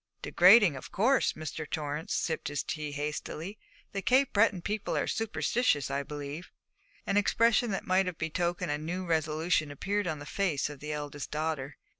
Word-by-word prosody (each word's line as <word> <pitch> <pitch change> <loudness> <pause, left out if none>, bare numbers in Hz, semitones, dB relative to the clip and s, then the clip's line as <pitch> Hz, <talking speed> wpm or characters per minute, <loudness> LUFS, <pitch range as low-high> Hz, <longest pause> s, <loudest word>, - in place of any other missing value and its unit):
'Degrading, 185 -2 +6
of 130 - -9
course.' 250 +6 +3
Mr. 155 0 -6
Torrance 155 +4 -3
sipped 160 -2 -1
his 145 0 -2
tea 150 -2 -4
hastily. 150 +6 -5 0.3
'The 195 - -3
Cape 260 +5 +3
Breton 200 -4 +3
people 210 0 -2
are - - +1
superstitious, 220 - 0
I 140 +1 0
believe.' 145 +3 -7 0.6
An 195 - +1
expression 230 +3 +3
that 195 - -3
might 185 0 +2
have 180 -3 -4
betokened 175 +1 -1
a 145 - -1
new 175 +4 -4
resolution 160 -1 +1
appeared 195 +7 -2
upon 155 -3 -2
the 145 - -9
fine - - -10
face 165 -8 +1
of 145 - -10
the 150 +2 -5
eldest 145 -1 -5
daughter. 150 -2 -3
160 Hz, 175 wpm, -30 LUFS, 150-195 Hz, 0.6 s, Degrading